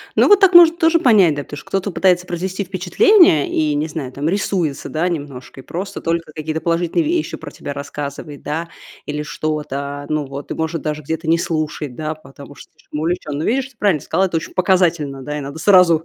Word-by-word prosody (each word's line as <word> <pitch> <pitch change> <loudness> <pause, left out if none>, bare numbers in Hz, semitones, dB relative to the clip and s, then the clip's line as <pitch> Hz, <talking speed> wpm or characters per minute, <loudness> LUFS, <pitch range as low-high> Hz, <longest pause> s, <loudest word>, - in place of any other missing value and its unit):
Ну, - - +5
вот 410 -1 +7
так 390 -2 +5
можно 340 -1 +8
тоже 330 0 +3
понять, 195 - +5
да. 145 - -4
Потому 145 - -9
что 150 - -11
кто-то 195 +1 -2
пытается 180 0 +2
произвести 185 +3 -3
впечатление, 190 - +4
и, 155 -1 0
не 150 +2 -1
знаю 145 -5 -5
там, 140 +3 -3
рисуется, 180 -6 -1
да, 160 +3 -1
немножко, 135 -5 -6
и - - -21
просто 185 +7 -6
только 165 -1 -2
какие-то 155 0 -4
положительные 170 - 0
вещи 330 +1 -1
про 160 -3 -9
тебя 145 - -7
рассказывает, 140 +1 -7
да, 165 +3 -3 0.4
или 150 0 -3
что-то, 145 -2 -4
ну, 155 -1 -1
вот, 140 +1 -8
и - - 0
может 160 0 -3
даже 155 -1 -3
где-то 160 +3 -4
не 165 +1 +4
слушать, 155 -5 -3
да, 155 0 -4
потому 140 -1 -14
что - - -15
слишком 150 -1 -8
увлечён. 155 -3 -2
Но 155 - -2
видишь, 265 +6 0
ты 255 - -25
правильно 190 -10 +1
сказала, 190 - +1
это 175 -3 -1
очень 160 - -6
показательно, 170 -7 +1
да, 150 +2 -4
и - - -4
надо 140 +3 -7
сразу, 180 -5 +5
160 Hz, 215 wpm, -19 LUFS, 145-185 Hz, 0.4 s, можно